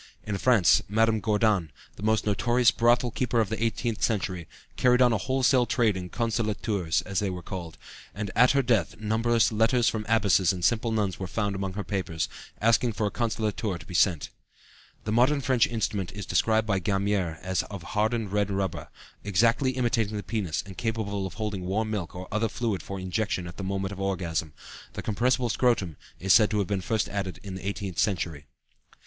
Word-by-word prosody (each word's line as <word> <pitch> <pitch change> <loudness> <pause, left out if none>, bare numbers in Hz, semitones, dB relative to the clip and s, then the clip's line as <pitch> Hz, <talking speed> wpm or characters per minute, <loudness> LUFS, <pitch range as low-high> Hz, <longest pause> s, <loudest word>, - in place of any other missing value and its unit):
In 100 -2 -3
France, 115 -7 +5
Madame 110 +1 +2
Gourdan, 105 -5 +1 0.3
the - - -12
most 110 +1 +1
notorious 120 +3 +3
brothel 120 +2 +2
keeper 120 0 0
of 110 -4 +1
the 110 +1 -2
eighteenth 115 0 -1
century, 95 -6 -1 0.3
carried 125 -1 +3
on 125 -2 +5
a 110 - +1
wholesale 130 +1 +2
trade 110 -4 +2
in 90 -1 -5
consolateurs, 105 -6 -1
as 100 -2 -2
they 100 - -1
were 90 -1 -6
called, 85 -4 -7 0.4
and 100 -1 -4
"at 125 - +6
her 140 -1 +3
death 110 -9 +1
numberless 115 +2 +2
letters 115 +2 +3
from 105 -2 -4
abbesses 100 -4 +3
and 90 -2 -2
simple 115 0 +1
nuns 105 -5 -1
were 95 - -4
found 100 0 -2
among 95 -1 -3
her 105 +1 -4
papers, 90 -4 -2 0.3
asking 115 +1 +3
for 105 - -1
a 105 - -1
'consolateur' 110 -4 -2
to - - -13
be - - -10
sent." 85 -3 +2 0.7
The 105 - -3
modern 125 +6 +3
French 130 -3 +2
instrument 105 -5 -2
is 105 -1 -6
described 110 +3 +2
by 100 -3 +1
Gamier 95 -3 0
as 95 -1 0
of 100 -4 -7
hardened 110 0 -1
red 105 -1 +1
rubber, 95 -3 -2 0.4
exactly 115 +7 +2
imitating 115 -4 0
the 100 - -4
penis 95 -6 -2
and 95 -2 -10
capable 100 -4 -2
of 90 - -11
holding 105 -2 -3
warm 110 +3 -1
milk 95 -6 -4
or 90 0 -7
other 110 +2 0
fluid 110 -6 -2
for 95 +4 -6
injection 95 0 -2
at 85 +1 -9
the 100 - -5
moment 95 0 -2
of 100 - -7
orgasm; 85 -6 -2 0.4
the - - -6
compressible 120 +3 +1
scrotum 110 - +1 0.2
is 95 0 +3
said 110 -2 +6
to 105 - -1
have 100 - +1
been 100 -2 -1
first 110 +3 0
added 95 -2 -4
in 100 -2 -7
the 95 +1 -6
eighteenth 100 -3 -4
century. 85 -8 -1
105 Hz, 195 wpm, -27 LUFS, 95-115 Hz, 0.7 s, at